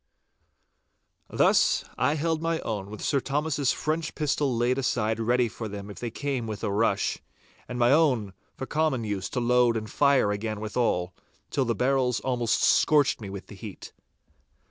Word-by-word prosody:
Thus - - +3
I 140 +4 +1
held 160 +1 -1
my 165 0 0
own 100 -3 -4
with 105 - -8
Sir 140 - +2
Thomas's 145 0 0
French 155 +1 -2
pistol 145 -4 0
laid 125 +3 +1
aside 115 -4 0
ready 120 +2 +2
for 110 0 -6
them 100 0 -7
if - - -10
they 120 - -3
came 130 -1 -3
with 105 0 -6
a 105 - 0
rush, 110 +3 +1 0.5
and 125 - -5
my 120 +1 +4
own 130 -10 +2 0.2
for 130 - -5
common 150 -5 0
use 100 -4 -3
to 125 - -2
load 120 -1 +3
and 110 -1 -4
fire 140 -5 +3
again 110 +1 -3
withal, 105 -5 -1 0.4
till 135 - +1
the 115 -1 0
barrels 125 +1 +1
almost 120 -3 0
scorched 145 -6 +3
me 100 - -6
with 100 0 -7
the - - -13
heat. 100 -1 -10
120 Hz, 170 wpm, -26 LUFS, 110-140 Hz, 0.5 s, my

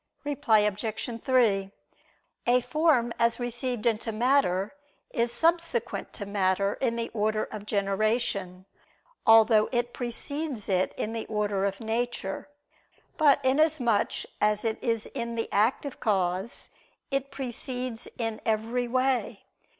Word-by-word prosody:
Reply 290 -6 +2
Obj. 220 +3 -3
3: 210 -7 +2 0.8
A 250 +1 +5
form 285 -6 +2
as 235 +1 +2
received 245 -1 -3
into 225 0 +1
matter, 220 -4 +2 0.4
is 235 -2 0
subsequent 325 -3 0
to 205 - -6
matter 200 0 +1
in 240 -3 +1
the 230 0 -2
order 215 0 0
of 210 -1 -7
generation, 200 -2 -1 0.6
although 225 -1 +6
it 240 -1 0
precedes 265 0 -4
it 185 -1 +1
in 220 - -2
the 225 -1 -4
order 205 -2 0
of 195 +1 -2
nature: 225 -1 -3 0.7
but 290 -4 +4
inasmuch 260 -5 +2 0.2
as 210 +1 +2
it 220 -1 -1
is 230 -2 0
in 235 -3 -4
the 225 - -1
active 240 +6 +1
cause, 190 +1 -1 0.4
it 275 0 0
precedes 250 -2 -4
in 225 -2 -3
every 225 +3 0
way. 255 -4 0
230 Hz, 125 wpm, -28 LUFS, 210-250 Hz, 0.8 s, although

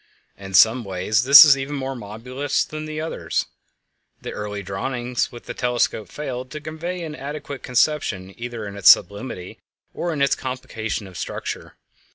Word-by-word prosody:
In 95 -1 -7
some 115 +5 +6
ways 100 +4 0
this 140 +4 +11
is 145 -3 +7
even 135 +2 -4
more 135 -1 -3
marvelous 125 +6 -3
than 155 0 -6
the 155 0 -5
others. 160 +1 -2 0.7
The - - -7
early 105 -1 -5
drawings 120 +6 -2
with 120 - -11
the - - -5
telescope 120 -3 -1
failed 130 -4 -5
to 150 - -6
convey 165 +4 -5
an 155 -2 -6
adequate 145 -1 -7
conception 115 -8 0
either 120 -2 -6
of 100 0 -7
its 100 - +6
sublimity 100 -1 +2 0.3
or 175 - -2
of 155 - -3
its 140 -1 +3
complication 115 -5 -4
of 95 -2 -9
structure. - - -5
125 Hz, 165 wpm, -22 LUFS, 105-145 Hz, 0.7 s, this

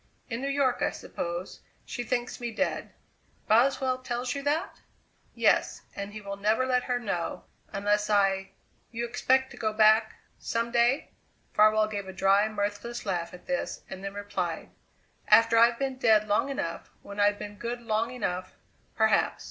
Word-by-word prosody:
"In 230 +2 -3
New 275 - -2
York, 275 -3 +1
I - - +2
suppose. 175 +1 -6 0.3
She 245 - -4
thinks 240 +1 -2
me 240 -1 -4
dead." 280 +6 -2 0.6
"Boswell 255 +3 +3
tells 245 0 -3
you 280 - -4
that?" 290 +3 -2 0.5
"Yes. - - +2
And 200 0 -5
he 215 +1 -8
will 200 -1 -6
never 215 +5 +2
let 250 -1 +1
her 250 -1 0
know. 195 -8 -3 0.3
Unless 205 +1 0
I 195 -2 +2 0.2
" - - -39
"You 235 0 -3
expect 260 +2 +1
to - - -11
go 215 -1 0
back 220 +1 +4 0.2
some 230 0 -2
day?" 240 +4 +2 0.4
Farwell 215 0 +5
gave 200 -2 -5
a 190 - -7
dry, 195 +3 +3
mirthless 210 +3 -3
laugh 175 -4 -2
at 180 - -13
this, 270 0 -3
and 190 0 -7
then 195 0 -5
replied: 185 -5 -4 0.6
"After 230 0 +6
I've 235 0 +5
been 270 -1 -2
dead 215 -3 +4
long 210 +7 +1
enough, 170 -11 -4
when 200 0 -8
I've 205 0 +4
been 205 0 -8
good 240 +1 -3
long 225 0 0
enough, 185 -7 -4 0.4
perhaps. 220 0 +2
220 Hz, 170 wpm, -28 LUFS, 205-245 Hz, 0.6 s, After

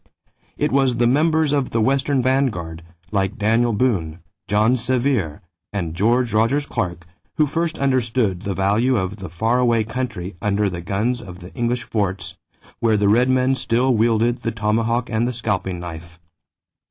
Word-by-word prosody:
It - - 0
was 135 -2 +2
the 120 0 +2
members 155 +3 +2
of 140 -3 0
the 115 - -1
western 135 +3 +1
vanguard, 115 -12 0 0.3
like 100 +2 -1
Daniel 115 +3 +2
Boone, 100 -9 0 0.3
John 105 +4 +3
Sevier, 125 - -1 0.3
and 85 -6 -3
George 115 +5 +1
Rogers 115 +7 +2
Clark, 85 - -3 0.3
who 155 - +4
first 165 +2 -2
understood 120 -8 0
the 100 -2 -3
value 105 +7 +2
of 95 +1 -2
the 95 -4 -7
far 110 +9 0
away 120 -3 +3
country 110 -6 -4
under 105 -1 +1
the 85 -1 -5
guns 110 +7 -1
of 90 -4 -10
the 90 0 -12
English 120 -1 -1
forts, 100 -4 -3 0.4
where 110 -2 +2
the 100 0 +2
Red 120 +5 +4
Men 130 0 +3
still 130 0 +1
wielded 115 +1 +2
the 115 - -1
tomahawk 115 +3 0
and 110 +2 +1
the 125 - -2
scalping 95 -6 -2
knife. 85 0 -9
115 Hz, 165 wpm, -21 LUFS, 100-125 Hz, 0.4 s, who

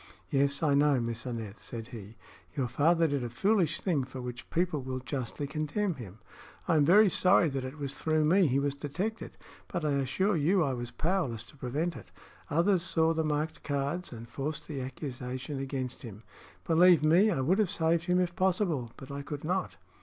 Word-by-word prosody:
"Yes, 140 +2 +1
I 150 -2 +3
know, 140 -1 +4
Miss 115 +1 -3
Aneth," 115 -4 -5
said 115 0 -7
he. 110 -2 -10 0.4
"Your 135 -4 0
father 165 +7 +3
did 140 -3 -1
a 120 - -3
foolish 195 - +1
thing, 160 -8 +1
for 130 0 -8
which 125 -1 -7
people 170 -4 0
will 130 0 -4
justly 130 +1 -4
condemn 155 +7 -1
him. 110 - -10 0.5
I 170 - +3
am 150 - +5
very 205 +7 +7
sorry 180 -2 +4
that 135 -2 -3
it 130 +3 -7
was 140 -2 -4
through 155 -1 +1
me 180 +3 +4
he 135 0 +1
was 140 0 0
detected, 170 +11 -4 0.3
but 170 -3 -3
I 150 - +1
assure 140 +9 +1
you 170 +4 +3
I 135 -3 0
was 120 -1 -4
powerless 135 - -1
to 130 - -16
prevent 145 +6 -2
it. 90 - -11 0.4
Others 175 +4 +3
saw 165 -2 +2
the 160 0 0
marked 155 +1 -2
cards 145 +5 -2
and 115 -1 -9
forced 145 +5 -4
the 140 -4 -4
accusation 130 +1 -5
against 130 -2 -4
him. 110 -2 -9 0.4
Believe 170 -1 +5
me, 175 +8 +5
I 170 - 0
would 180 +10 +2
have 210 -5 +2
saved 165 0 +1
him 180 0 +2
if 175 -1 0
possible; 175 - 0
but 135 0 -10
I 140 0 -4
could 145 0 -6
not." 180 - -2
145 Hz, 200 wpm, -30 LUFS, 130-170 Hz, 0.5 s, very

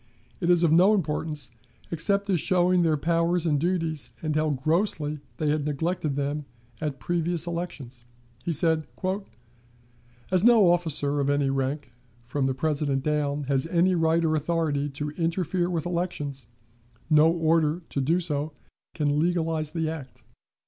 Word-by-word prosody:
It 175 - -1
is 175 -1 +5
of 165 - +4
no 185 +6 +6
importance 150 -5 -2 0.4
except 200 +5 +1
as 180 - +2
showing 180 +2 +3
their 160 -2 +2
powers 170 +2 +1
and 150 -3 +2
duties, 165 -3 -1
and 155 -1 -1
how 155 0 +2
grossly 150 +1 0 0.2
they 155 - 0
had 150 0 +1
neglected 155 0 -1
them 145 +1 -2 0.4
at 150 -3 -3
previous 175 -1 -1
elections. 150 -8 -5 0.4
He 170 - -1
said: 160 0 +2 1.5
"As 185 0 +3
no 225 -6 +6
officer 145 -4 0
of 140 0 +1
any 145 -1 +2
rank, 135 +1 -2 0.3
from 135 +2 -1
the 135 -1 0
President 145 -1 0
down, 150 -1 0
has 135 +1 0
any 175 +2 +3
right 165 -1 +2
or 155 - +2
authority 155 -2 0
to 145 +1 -4
interfere 175 +2 -1
with 170 -3 -2
elections, 150 -8 -3 0.6
no 155 0 +5
order 165 0 +1
to 140 - -1
do 165 +7 +2
so 150 -3 -2 0.4
can 150 -2 +1
legalize 160 -2 0
the 160 -1 -1
act. 155 -5 -7
160 Hz, 150 wpm, -26 LUFS, 145-170 Hz, 1.5 s, no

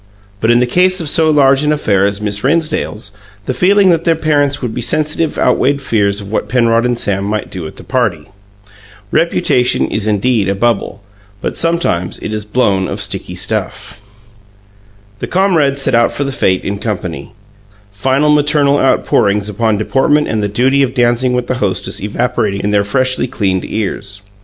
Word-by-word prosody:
But 110 - 0
in 120 0 +5
the 125 - +3
case 185 +8 +2
of 165 - -3
so 160 +2 +3
large 140 -2 +4
an 150 0 +1
affair 100 -10 +1
as 100 0 -4
Miss 105 -1 -2
Rennsdale's, 155 -8 -1 0.3
the 130 - -2
feeling 190 +6 +4
that 165 -1 +1
their 165 -2 +2
parents 145 -2 +1
would 120 -4 -4
be 125 - -4
sensitive 155 +4 -1
outweighed 135 +2 +2
fears 100 -6 0
of 100 0 -9
what - - -2
Penrod 115 -1 +2
and 120 -1 -1
Sam 100 -4 -1
might 105 +1 -3
do 90 -5 -6
at - - -11
the - - -12
party. 105 - -1 0.8
Reputation 155 -6 +1
is 110 0 -2
indeed 105 -1 +1
a 100 - 0
bubble, 115 -1 -1 0.4
but - - -4
sometimes 165 - -1
it 110 - -4
is 105 -1 -4
blown 100 -4 +1
of 100 - -5
sticky 95 -2 -3
stuff. 100 +1 -4 1.2
The - - -4
comrades 160 -8 +1
set 135 - 0
out 120 0 +3
for 145 - -3
the 140 - -3
fete 95 -9 0
in 100 0 -3
company, 100 -6 -5 0.6
final 135 +8 +1
maternal 145 -1 +2
outpourings 105 -5 +1
upon 110 +1 0
deportment 135 +7 +1
and 110 -1 -1
the 105 - 0
duty 130 +6 +2
of 130 -2 0
dancing 120 +1 +1
with 125 -1 -1
the 125 0 -3
hostess 100 -5 -2
evaporating 105 -1 -1
in 105 - -1
their 100 -1 +2
freshly 130 +4 0
cleaned 95 -6 -1
ears. 100 -1 -4
120 Hz, 180 wpm, -14 LUFS, 100-140 Hz, 1.2 s, in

